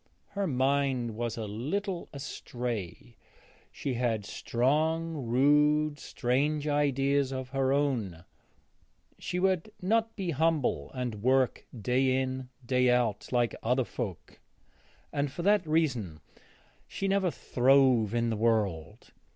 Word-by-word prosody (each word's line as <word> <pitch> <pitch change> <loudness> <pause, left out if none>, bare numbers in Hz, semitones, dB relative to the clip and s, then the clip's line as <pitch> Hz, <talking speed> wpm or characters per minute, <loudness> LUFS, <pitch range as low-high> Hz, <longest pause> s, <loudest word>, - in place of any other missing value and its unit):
Her 200 -1 -2
mind 130 -4 0
was 120 0 -3
a 110 - -3
little 170 - -3
astray: 120 - -6 0.5
she 135 - -3
had 115 -4 -1
strong, 155 +9 0
rude, 150 +4 +3
strange 145 +6 -1
ideas 140 -1 +1
of 130 -1 -4
her 135 0 0
own; 120 - -1 0.9
she 180 - -3
would 190 +2 +1
not 225 +4 +1
be 190 -5 -2
humble 150 - 0
and 120 -5 -4
work 130 +1 +2
day 130 +4 +2
in, 130 -1 -3 0.2
day 125 0 +3
out, 120 -4 +1
like 120 -2 +1
other 125 +2 +1
folk, 105 -10 -6 0.7
and 140 -1 -1
for 170 +5 -5
that 200 -3 +3
reason 130 - 0 0.7
she 195 - -3
never 195 -1 +2
throve 125 -6 +3
in 115 0 +1
the - - -1
world. 105 -8 -1
130 Hz, 120 wpm, -29 LUFS, 120-150 Hz, 0.9 s, rude